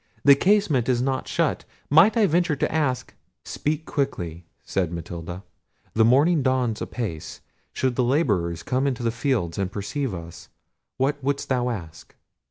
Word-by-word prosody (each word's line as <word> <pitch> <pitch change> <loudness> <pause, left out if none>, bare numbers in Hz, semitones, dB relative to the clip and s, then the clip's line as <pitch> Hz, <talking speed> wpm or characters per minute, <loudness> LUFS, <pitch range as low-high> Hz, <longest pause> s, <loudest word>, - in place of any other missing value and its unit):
the 140 - +9
casement 155 - +2
is 125 -2 +2
not 130 +1 -1
shut; - - 0 0.3
might 175 +10 +6
I 220 - +5
venture 175 -2 +2
to - - -1
ask—" 145 -5 -1 0.3
"Speak 155 +2 -2
quickly," 85 - -3 0.2
said 90 -4 -1
Matilda; 85 +2 -6 0.5
"the 110 - +4
morning 145 +8 +4
dawns 125 -4 0
apace: 85 -10 -5 0.3
should 130 -2 -1
the 125 - +2
labourers 105 - +1
come 130 +2 0
into 125 -3 -2
the 115 - +1
fields 115 - -1
and 95 -1 -1
perceive 110 +3 -3
us—What 130 - -6
wouldst 140 +1 -1
thou 125 -2 +1
ask?" 85 -9 -7
125 Hz, 150 wpm, -24 LUFS, 95-145 Hz, 0.5 s, the